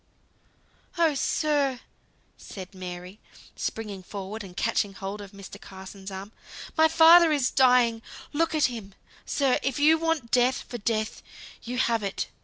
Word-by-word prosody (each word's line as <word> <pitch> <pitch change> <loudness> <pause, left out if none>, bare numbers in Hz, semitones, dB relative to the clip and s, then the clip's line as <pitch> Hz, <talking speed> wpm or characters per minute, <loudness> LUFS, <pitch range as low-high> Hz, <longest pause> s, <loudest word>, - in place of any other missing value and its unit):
"Oh, 330 -3 +3
sir!" 280 -2 0 0.5
said 190 -2 -10
Mary, 180 +1 -8 0.4
springing 210 -4 -4
forward, 200 +3 -7
and 180 -1 -12
catching 210 -3 0
hold 200 +1 -6
of 200 - -9
Mr. 195 -2 -11
Carson's 190 0 -10
arm, 195 +2 -8 0.4
"my 320 0 +6
father 325 +1 +7
is 280 -4 +1
dying. 250 -3 +4 0.3
Look 325 +1 +1
at 305 - +3
him, 215 -6 -5 0.3
sir. 270 -3 +2
If 270 -2 -2
you 310 +2 +5
want 325 -8 -1
Death 250 +1 +2
for 240 - -6
Death, 215 0 -2 0.4
you 245 +2 -5
have 230 -3 +1
it. 200 -1 -3
230 Hz, 145 wpm, -26 LUFS, 195-285 Hz, 0.5 s, father